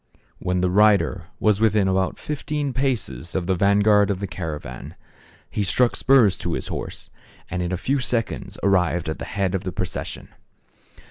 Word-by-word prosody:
When 90 Hz, 0 st, -1 dB
the 90 Hz, 0 st, +1 dB
rider 100 Hz, -, +3 dB
was 105 Hz, -2 st, +3 dB
within 105 Hz, -3 st, +3 dB
about 95 Hz, 0 st, 0 dB
fifteen 150 Hz, -1 st, -3 dB
paces 115 Hz, -, -2 dB
of 95 Hz, -2 st, 0 dB
the 95 Hz, -, +1 dB
vanguard 100 Hz, +2 st, +4 dB
of 100 Hz, -2 st, -1 dB
the 100 Hz, -, -3 dB
caravan, 75 Hz, -9 st, -6 dB, 0.5 s
he 105 Hz, -, -3 dB
struck 120 Hz, +5 st, +2 dB
spurs 120 Hz, -8 st, +4 dB
to 85 Hz, -, -3 dB
his 65 Hz, -, -4 dB
horse, -, -, -6 dB, 0.4 s
and 90 Hz, -, -2 dB
in 90 Hz, 0 st, -2 dB
a 90 Hz, -, -1 dB
few 135 Hz, +9 st, 0 dB
seconds 120 Hz, -3 st, -2 dB
arrived 90 Hz, -4 st, +2 dB
at 80 Hz, -, -4 dB
the -, -, -5 dB
head 100 Hz, -1 st, -1 dB
of 95 Hz, 0 st, -1 dB
the 95 Hz, -, -3 dB
procession. -, -, -5 dB
95 Hz, 175 wpm, -23 LUFS, 90-110 Hz, 0.5 s, vanguard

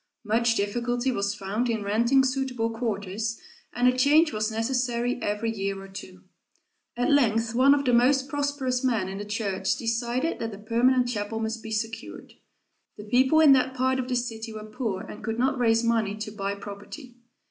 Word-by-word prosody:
Much 230 Hz, +2 st, +2 dB
difficulty 240 Hz, +5 st, -1 dB
was 200 Hz, -3 st, -1 dB
found 210 Hz, +5 st, -2 dB
in 220 Hz, -3 st, -1 dB
renting 235 Hz, +6 st, +3 dB
suitable 255 Hz, -3 st, -1 dB
quarters, 220 Hz, -1 st, -3 dB, 0.3 s
and 245 Hz, +1 st, +2 dB
a 250 Hz, -, +4 dB
change 300 Hz, +4 st, +4 dB
was 215 Hz, +1 st, -1 dB
necessary 245 Hz, +1 st, -1 dB
every 210 Hz, +2 st, -1 dB
year 195 Hz, -1 st, -3 dB
or 195 Hz, -, -10 dB
two. 185 Hz, -1 st, -11 dB, 0.7 s
At 245 Hz, +3 st, +1 dB
length 225 Hz, -5 st, +2 dB
one 265 Hz, +4 st, +5 dB
of 280 Hz, 0 st, -2 dB
the 250 Hz, -, +2 dB
most 260 Hz, +3 st, +4 dB
prosperous 280 Hz, -3 st, -1 dB
men 230 Hz, -7 st, +1 dB
in 195 Hz, +1 st, -6 dB
the 205 Hz, -, -5 dB
church 205 Hz, -2 st, -1 dB
decided 240 Hz, +6 st, -1 dB
that 225 Hz, -2 st, -4 dB
a -, -, -11 dB
permanent 245 Hz, +4 st, +2 dB
chapel 220 Hz, -1 st, -3 dB
must 225 Hz, 0 st, -3 dB
be 220 Hz, -, -8 dB
secured. 220 Hz, +1 st, -5 dB, 0.6 s
The 210 Hz, -, -8 dB
people 260 Hz, +8 st, +3 dB
in 305 Hz, -3 st, +7 dB
that 260 Hz, 0 st, +2 dB
part 260 Hz, +1 st, +1 dB
of 250 Hz, -, -3 dB
the 255 Hz, -, -1 dB
city 230 Hz, -2 st, -3 dB
were 215 Hz, -1 st, -8 dB
poor 215 Hz, -3 st, -3 dB
and -, -, -10 dB
could 225 Hz, 0 st, -3 dB
not 265 Hz, +1 st, +1 dB
raise 230 Hz, -1 st, +3 dB
money 225 Hz, -3 st, +1 dB
to 215 Hz, 0 st, -6 dB
buy 200 Hz, -1 st, -3 dB
property. 205 Hz, +6 st, -10 dB
230 Hz, 185 wpm, -26 LUFS, 215-255 Hz, 0.7 s, in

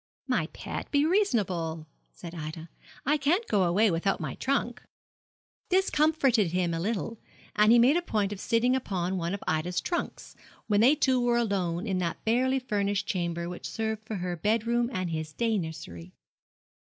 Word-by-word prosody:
'My -, -, 0 dB
pet, -, -, -7 dB
be 285 Hz, 0 st, +3 dB
reasonable,' 190 Hz, -, 0 dB, 0.3 s
said 170 Hz, -2 st, -10 dB
Ida; 160 Hz, 0 st, -7 dB, 0.4 s
'I 295 Hz, +3 st, +3 dB
can't 330 Hz, +11 st, +1 dB
go 195 Hz, -3 st, +2 dB
away 200 Hz, +5 st, +3 dB
without 175 Hz, +4 st, 0 dB
my -, -, -4 dB
trunk.' 245 Hz, -3 st, -1 dB, 0.9 s
This 380 Hz, +1 st, +2 dB
comforted 275 Hz, -, +3 dB
him 180 Hz, -2 st, +1 dB
a 165 Hz, -, -2 dB
little, 220 Hz, +4 st, -3 dB, 0.4 s
and 210 Hz, +1 st, +5 dB
he 240 Hz, -, +7 dB
made 250 Hz, +6 st, +5 dB
a -, -, +1 dB
point 210 Hz, -, -1 dB
of 200 Hz, -, -8 dB
sitting 245 Hz, +3 st, +2 dB
upon 190 Hz, -7 st, -2 dB
one 170 Hz, +3 st, -2 dB
of 200 Hz, -, -9 dB
Ida's 160 Hz, +3 st, 0 dB
trunks, 345 Hz, -, -4 dB, 0.3 s
when 205 Hz, -1 st, +2 dB
they 265 Hz, +6 st, +6 dB
two 260 Hz, -4 st, +2 dB
were 240 Hz, 0 st, +2 dB
alone 190 Hz, -5 st, -1 dB
in 190 Hz, -4 st, -1 dB
that 170 Hz, -2 st, -3 dB
barely 255 Hz, +4 st, +2 dB
furnished 205 Hz, -5 st, -1 dB
chamber 170 Hz, -5 st, -2 dB
which 175 Hz, 0 st, -6 dB
served 220 Hz, -1 st, -3 dB
for 220 Hz, -, -3 dB
her 180 Hz, -1 st, -3 dB
bed 215 Hz, +6 st, 0 dB
room 235 Hz, 0 st, +1 dB
and 185 Hz, -6 st, -2 dB
his 155 Hz, -1 st, -4 dB
day 225 Hz, 0 st, 0 dB
nursery. 90 Hz, -, -7 dB
210 Hz, 180 wpm, -28 LUFS, 175-245 Hz, 0.9 s, he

